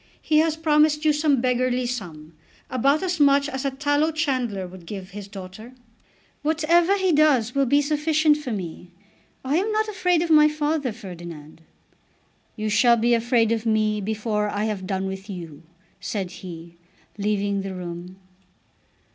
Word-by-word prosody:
He 305 -1 +2
has 320 0 +1
promised 305 -1 +2
you 305 - +5
some 295 -4 +2
beggarly 250 0 +1
sum, 165 -10 -6 0.4
about 275 +6 +2
as 355 -2 -2
much 280 -1 +4
as 265 -2 -4
a - - +2
tallow 290 +3 0
chandler 255 -11 -1
would 180 -1 -12
give 195 -1 -7
his 200 0 -8
daughter." 200 +4 -10 0.7
"Whatever 335 +5 +2
he 380 -2 +1
does 290 -7 +3
for - - -24
me 275 - -1
will 275 - +4
be 285 +2 +4
sufficient 305 +1 +2
for 295 -5 -6
me. 180 -3 -6 0.6
I 280 +4 +1
am 410 +5 0
not 435 0 0
afraid 360 -5 +1
of 335 - -2
my 300 -1 +7
father, 300 -3 -1
Ferdinand." 170 -7 -10 0.9
"You 215 -1 -3
shall 235 +3 +4
be 235 +1 +2
afraid 230 -1 +2
of 230 0 -1
me 215 -1 +1
before 210 0 -1
I 205 0 -2
have 205 -4 -3
done 190 0 -2
with 190 +2 -6
you," 165 -6 -8 0.4
said 190 -4 -4
he, 170 -2 -10 0.4
leaving 200 -1 0
the 195 -1 -6
room. 175 0 -7
240 Hz, 165 wpm, -23 LUFS, 195-300 Hz, 0.9 s, my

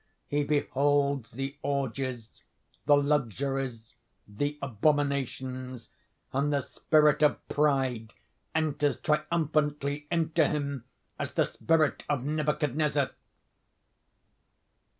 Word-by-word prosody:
He 145 0 0
beholds 140 -3 +1
the 135 +3 -5
orgies, 130 -4 -3 0.5
the 145 - +7
luxuries, 135 -3 -1 0.3
the 145 +8 -2
abominations; 130 -1 -1 0.4
and 140 +2 +1
the 140 -1 +2
spirit 150 +1 +3
of 150 -1 +2
Pride 130 -6 +1 0.4
enters 145 -4 +1
triumphantly 150 -2 0
into 165 -2 +2
him 140 -4 -3 0.3
as - - -3
the - - +3
spirit 160 -2 +1
of 140 -4 0
Nebuchadnezzar.... 150 -1 0
140 Hz, 90 wpm, -29 LUFS, 130-150 Hz, 0.5 s, the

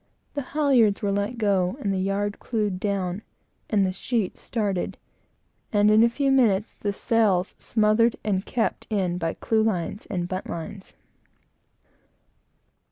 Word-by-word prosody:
The 285 - -2 0.2
halyards 245 -10 +3
were 200 - +1
let 205 +4 -1
go 200 -2 +1
and 200 -7 -1
the 190 - -1
yard 200 +2 -1
clewed 210 -5 -2
down, 195 -1 -2 0.5
and 200 -3 +3
the 185 - 0
sheets 215 0 -2
started, 205 -6 -2 0.7
and 210 0 +4
in 215 +1 +6
a 235 - +5
few 275 +3 0
minutes 220 -6 +3
the 205 - -3
sails 200 -3 +1
smothered 220 +1 +2
and 195 -3 0
kept 230 +1 -2
in 185 -5 0
by 165 -1 -2
clewlines 215 -4 -1
and 175 -3 -2
buntlines. 185 +1 -6
205 Hz, 135 wpm, -25 LUFS, 190-225 Hz, 0.7 s, in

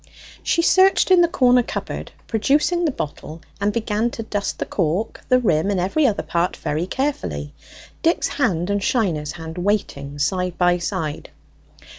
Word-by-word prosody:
She 335 - +1
searched 375 +2 +4
in 365 -1 +7
the 345 - +5
corner 250 -6 +4
cupboard, - - -5
produced 275 - +2
the 345 -2 +1
bottle, 155 - -6 0.2
and 205 +1 +2
began 225 0 0
to 230 - -6
dust 205 -2 -3
the - - -3
cork, 180 +4 -1
the 255 - +6
rim, 195 -7 +1
and 200 -2 0
every 230 - +2
other 215 - -1
part 170 +1 -1
very 155 +4 -2
carefully, 90 - -3 0.5
Dick's 335 +1 +2
hand 195 - 0
and 205 0 0
Shiner's 175 - 0
hand 165 +1 -7
waiting 160 -8 -2
side 180 +3 -1
by 175 0 +3
side. 160 -3 -4
200 Hz, 160 wpm, -21 LUFS, 170-250 Hz, 0.5 s, in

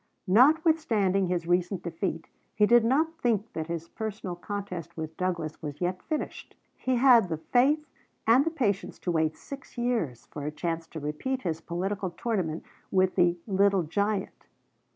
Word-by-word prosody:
Notwithstanding 235 - +4
his 175 -2 -1
recent 175 +1 0
defeat, 165 -1 -3 0.3
he 210 - +5
did 240 +2 +6
not 315 +7 +1
think 225 -2 0
that 160 -1 -3
his 165 -1 -4
personal 210 -3 -5
contest 180 -3 -6
with 160 0 -5
Douglas 170 -4 -2
was 145 -1 -6
yet 180 +1 -1
finished. 310 -2 -5 0.2
He 260 0 0
had 240 -6 +6
the 160 - -1
faith 275 - +2 0.4
and 235 +5 +6
the 325 - 0
patience 235 - -1
to 180 - -2
wait 160 -1 +1
six 275 -2 -10
years 230 - -1
for 145 - -8
a - - -2
chance 165 +1 -3
to 160 - -7
repeat 155 - -3
his 165 -2 -2
political 190 +3 -2
tournament 175 -4 -2 0.3
with 185 -1 +3
the 175 -1 +3
"Little 195 -2 +3
Giant." 200 +5 -2
190 Hz, 160 wpm, -28 LUFS, 170-235 Hz, 0.4 s, did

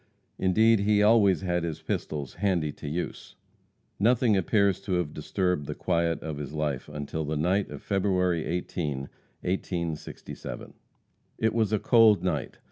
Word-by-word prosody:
Indeed, 110 +4 +4
he 105 +1 +3
always 105 -4 +5
had 90 -2 -1
his 80 -3 -3
pistols 70 -4 -3
"handy 90 -7 0
to 75 - -9
use." 85 +4 -5 0.6
Nothing 115 +1 +3
appears 100 0 +2
to 100 -2 -3
have 90 -4 -1
disturbed 90 -1 -1
the - - -4
quiet 85 -1 0
of 80 -2 -4
his 75 0 -6
life 75 -3 -2
until 75 +1 -4
the 75 +1 -2
night 90 +6 +1
of - - -9
February 90 -4 +1
18, 80 -5 -3 0.4
1867. 85 -4 -4 0.6
It 110 - +1
was 110 -3 +1
a 110 - +3
cold 110 -5 +5
night. 90 -6 -2
90 Hz, 145 wpm, -27 LUFS, 75-100 Hz, 0.6 s, always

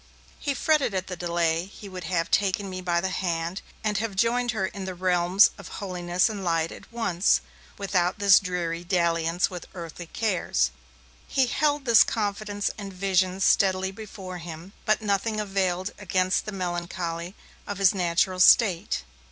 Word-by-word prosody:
He 285 -2 -2
fretted 290 -6 +2
at 185 0 -1
the 185 - -6
delay; 170 -1 0
he 200 +1 -12
would 185 -2 -7
have 165 -1 -1
taken 200 0 +1
me 185 0 -5
by 175 -1 0
the 190 - -1
hand, 170 0 -2 0.2
and 210 -2 0
have 220 -3 -3
joined 240 +4 +1
her 215 -4 0
in 190 0 -6
the 185 -1 -5
realms 180 +2 +4
of - - -9
holiness 180 -2 0
and 210 -3 -5
light, 165 -2 0
at - - -12
once, 205 -6 +2 0.4
without 185 -2 0
this 200 -1 +6
dreary 175 -3 -3
dalliance 170 -1 +1
with 180 -2 -7
earthly 170 0 -8
cares. 185 - 0 0.6
He 265 - +2
held 290 +2 0
this 230 -3 +7
confidence 205 -1 -2
and 200 -1 -6
vision 185 0 +1
steadily 190 0 +3
before 195 -3 -8
him, 170 +3 -9
but 215 +1 +2
nothing 215 +2 0
availed 190 -2 -1
against 185 -1 0
the - - -3
melancholy 175 -1 -4 0.3
of 205 - -4
his 195 +1 +4
natural 185 0 +1
state. 185 -2 +4
185 Hz, 160 wpm, -26 LUFS, 175-205 Hz, 0.6 s, this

